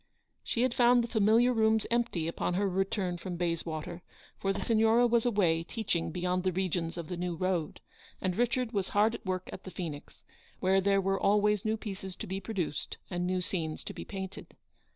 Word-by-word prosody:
She 235 - 0
had 255 -2 +2
found 245 0 +5
the - - -3
familiar 230 +2 +4
rooms 220 -1 +3
empty 230 -9 0
upon 170 +1 -1
her 200 +2 +2
return 190 -1 -1
from 180 0 -5
Bayswater, 170 -1 -3 0.4
for 195 - +1
the - - -3
Signora 225 +1 +4
was 235 0 +3
away 180 -8 +2
teaching 180 -4 -2
beyond 180 +2 -1
the 185 0 +1
regions 175 -2 -1
of 170 -2 -5
the 180 - -4
New 175 0 -2
Road, 180 -2 -1 0.4
and 185 -2 -1
Richard 245 +1 +1
was 200 -4 -1
hard 210 +2 +3
at 235 - -7
work 185 0 -2
at - - -8
the - - -7
Phoenix, 160 -6 -7 0.4
where 190 +1 +3
there 195 0 +3
were 195 0 0
always 210 0 +3
new 220 +1 +1
pieces 195 -3 -6
to - - -6
be 190 +1 -3
produced 185 -7 -3
and 180 0 -1
new 185 0 0
scenes 160 -4 -3
to - - -6
be - - -7
painted. 190 -1 -7
190 Hz, 195 wpm, -31 LUFS, 180-220 Hz, 0.4 s, found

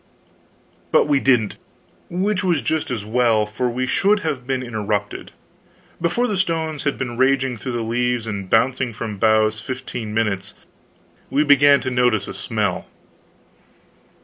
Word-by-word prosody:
But - - +4
we 145 -2 +3
didn't; 120 -6 +2 0.5
which 190 +3 -1
was 175 -6 +1
just 160 -1 -1
as 115 -5 -3
well, 115 -1 +2
for 110 +4 -2
we 125 +2 -2
should 200 +10 +2
have 125 -10 -3
been 130 -1 -1
interrupted. 105 -3 -3 0.7
Before 205 +9 +1
the 210 -5 -1
stones 160 -5 -1
had 140 - 0
been 120 -2 -4
raging 130 0 +2
through 125 +3 -5
the 120 -1 -2
leaves 120 +1 -1
and 100 -3 -5
bouncing 125 +2 +2
from 110 0 -5
the 100 - -8
boughs 110 0 +3
fifteen 125 -3 -5
minutes, 105 -3 -1 0.7
we 145 - +2
began 145 -1 +5
to 130 - -3
notice 125 -5 +1
a - - -6
smell. 105 -6 -2
125 Hz, 150 wpm, -21 LUFS, 110-140 Hz, 0.7 s, began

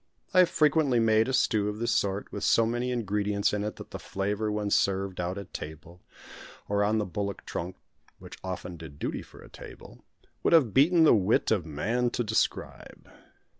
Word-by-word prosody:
I 185 - +5
have 180 - +6
frequently 150 -4 +3
made 110 0 +3
a - - -1
stew 110 -5 +2
of 105 - -5
this 115 +1 -1
sort, 100 0 -1
with 100 - -5
so 115 - +4
many 120 +2 -1
ingredients 105 -4 0
in 105 0 -1
it 105 - -4
that - - -11
the - - -6
flavour 105 +2 -2
when 105 -1 -2
served 95 -1 +1
out 90 +2 -3
at 100 -2 -9
table 80 +3 -9 0.7
or 100 0 +1
on 105 +2 +1
the 105 - 0
bullock 100 +2 -4
trunk 90 +2 -5 0.4
which - - -12
often 90 -1 -6
did 75 -3 -11
duty - - -3
for - - -15
a - - -13
table - - -13 0.4
would - - +2
have 135 - +5
beaten 165 +5 +5
the 160 - +7
wit 105 -1 +2
of 95 -7 +1
man 115 +12 -1
to 120 - -2
describe. 110 0 -3
105 Hz, 195 wpm, -28 LUFS, 95-115 Hz, 0.7 s, the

